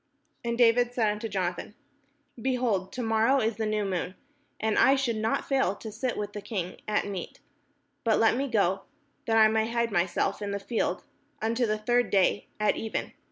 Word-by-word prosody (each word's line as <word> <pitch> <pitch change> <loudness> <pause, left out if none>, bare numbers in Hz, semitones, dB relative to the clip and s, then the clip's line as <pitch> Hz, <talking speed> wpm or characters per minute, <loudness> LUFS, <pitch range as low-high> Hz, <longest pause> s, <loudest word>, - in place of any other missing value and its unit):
And 235 0 -2
David 245 0 +4
said 220 -4 +2
unto 210 +2 -4
Jonathan: 185 +1 -3 0.7
"Behold, 240 -7 0
to 250 - -3
morrow 225 +4 +3
is 220 -2 0
the 220 -1 -1
new 215 -1 0
moon, 185 -1 -3 0.4
and 220 -1 +1
I 270 - +6
should 265 -4 0
not 220 +1 -1
fail 265 -8 +1
to 220 +1 -8
sit 250 +3 -3
with 205 0 -4
the 205 - -5
king 195 -4 -5
at 210 0 +1
meat: 195 -3 -6 0.6
but 225 -2 +3
let 225 0 +4
me 275 +3 -1
go, 195 -5 +1 0.5
that 225 -1 +3
I 220 -1 +8
may 220 +1 +1
hide 235 -1 0
myself 175 +2 0
in 205 - -3
the 200 0 -2
field 220 +3 -2 0.4
unto 230 +2 0
the 215 0 0
third 240 +2 +1
day 195 +1 +2
at 210 - +2
even. 220 - -3
220 Hz, 190 wpm, -28 LUFS, 205-235 Hz, 0.7 s, I